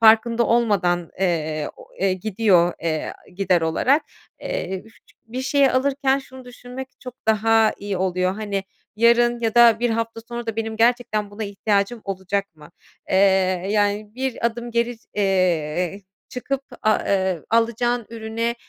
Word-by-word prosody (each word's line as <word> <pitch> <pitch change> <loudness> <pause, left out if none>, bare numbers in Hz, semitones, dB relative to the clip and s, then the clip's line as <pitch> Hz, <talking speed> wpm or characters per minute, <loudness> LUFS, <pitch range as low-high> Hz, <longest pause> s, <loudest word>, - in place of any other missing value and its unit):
farkında 230 +1 +5
olmadan, 190 -7 +1
eee, 155 -5 0
o, - - -14
eee, 190 0 +2
gidiyor, 185 -3 +2
eee, 160 -2 -1
aaa, - - -20
gider 185 -1 +1
olarak. 255 - +2 0.4
Eee, 345 - -3
bifıç 225 - -22
bir 250 +3 -5
şeyi 275 0 +3
alırken 270 +1 +1
şunu 260 -1 -12
düşünmek 250 +1 -9
çok 250 -2 -8
daha 220 0 +4
iyi 200 -1 -3
oluyor. 185 0 0
Hani, 200 -2 -3 0.3
yarın 235 +1 +4
ya 225 -2 -1
da 235 -2 +6
1 240 -1 +1
hafta 230 0 -2
sonra 240 0 -5
da 225 -1 -3
benim 225 -1 -3
gerçekten 225 -3 +1
buna 210 +2 -5
ihtiyacım 205 +2 0
olacak 195 -1 -3
mı? 150 +1 -15 0.4
Eee, - - +3 0.5
yani 205 0 0
bir 260 -2 -1
adım 235 +1 -4
geri, 235 +1 0 0.2
eee, 185 -2 0 0.3
çıkıp, 275 +2 -3 0.2
aaa, 215 0 +3
eee, 190 -3 +1
alacağın 235 +1 +1
ürüne, 230 +1 -3
220 Hz, 150 wpm, -22 LUFS, 190-240 Hz, 0.5 s, da